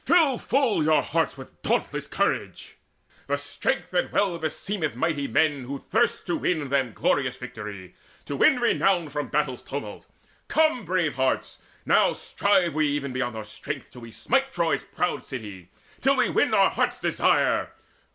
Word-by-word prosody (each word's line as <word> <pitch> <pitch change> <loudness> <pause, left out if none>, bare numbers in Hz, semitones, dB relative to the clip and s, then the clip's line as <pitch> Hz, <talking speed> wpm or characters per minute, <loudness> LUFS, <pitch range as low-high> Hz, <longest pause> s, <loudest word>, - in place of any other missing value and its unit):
fill 320 -6 +4
full 250 - +1
your 155 0 +3
hearts 165 -3 -1
with 130 - -13
dauntless - - -1
strength, - - -2 0.5
The 145 - +1
strength 145 +5 -2
that 180 -1 0
well 190 -4 +1
beseemeth 160 - -2
mighty 145 +1 -1
men 145 +1 +1
Who 140 +3 -4
thirst - - 0
to 175 - -1
win 155 -6 -1
them 135 -4 0
glorious 130 -2 0
victory, 105 -7 -8 0.3
To 145 - -4
win 250 - +4
renown 195 -8 +2
from 145 +1 -3
battle's - - -1
tumult! - - -7 0.4
Come, 310 -8 +2
Brave 175 -5 0
hearts, 130 0 0 0.3
now - - +4
strive 190 -5 +1
we 155 0 +2
even 145 -2 -2
beyond 125 -3 -2
our 110 - -5
strength 135 +6 -6
Till 125 - -12
we 115 - -9
smite 270 - 0
Troy's 170 -6 0
proud 180 - -2
city, 105 - -8 0.3
till - - +4
we - - +2
win - - +2
Our - - +5
hearts' - - 0
desire! - - +2
145 Hz, 160 wpm, -25 LUFS, 130-180 Hz, 0.5 s, Our